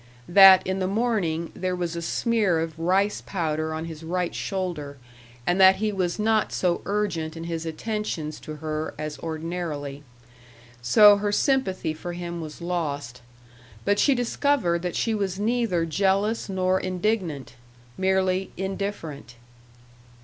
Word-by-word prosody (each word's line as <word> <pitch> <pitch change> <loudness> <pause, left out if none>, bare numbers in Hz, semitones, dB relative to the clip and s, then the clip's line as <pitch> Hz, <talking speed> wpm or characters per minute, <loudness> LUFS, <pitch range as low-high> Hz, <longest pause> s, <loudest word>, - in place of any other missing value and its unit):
That, 190 0 +8
in 190 +1 -1
the 185 - 0
morning, 195 -7 -1
there 185 0 -2
was 175 -1 -3
a 170 - -3
smear 205 -1 +1
of 165 0 -4
rice 190 +5 +1
powder 160 -4 -2
on 160 +1 -4
his 160 -2 -8
right 180 +2 -2
shoulder 170 -7 -4 0.5
and 180 +2 +2
that 190 0 +8
he 215 +2 -1
was 185 -3 -1
not 215 0 +1
so 175 -2 0
urgent 185 -6 -2
in 165 - -6
his 165 -1 -4
attentions 160 -3 -4
to 155 - -8
her 155 0 -4
as 155 -1 -5
ordinarily. 160 -3 -4 0.8
So 205 - +7
her 205 0 -1
sympathy 205 - +1
for 175 +3 -6
him 170 -1 -5
was 155 +1 -8
lost. 145 -8 -3 0.6
But 205 0 +2
she 280 - +4
discovered 245 -7 +1
that 180 -1 -3
she 225 - 0
was 195 -3 -2
neither 215 -6 +1
jealous 195 +6 0
nor 185 0 +1
indignant 185 - -2 0.4
merely 190 0 +1
indifferent. 190 -9 -5
180 Hz, 140 wpm, -25 LUFS, 160-200 Hz, 0.8 s, That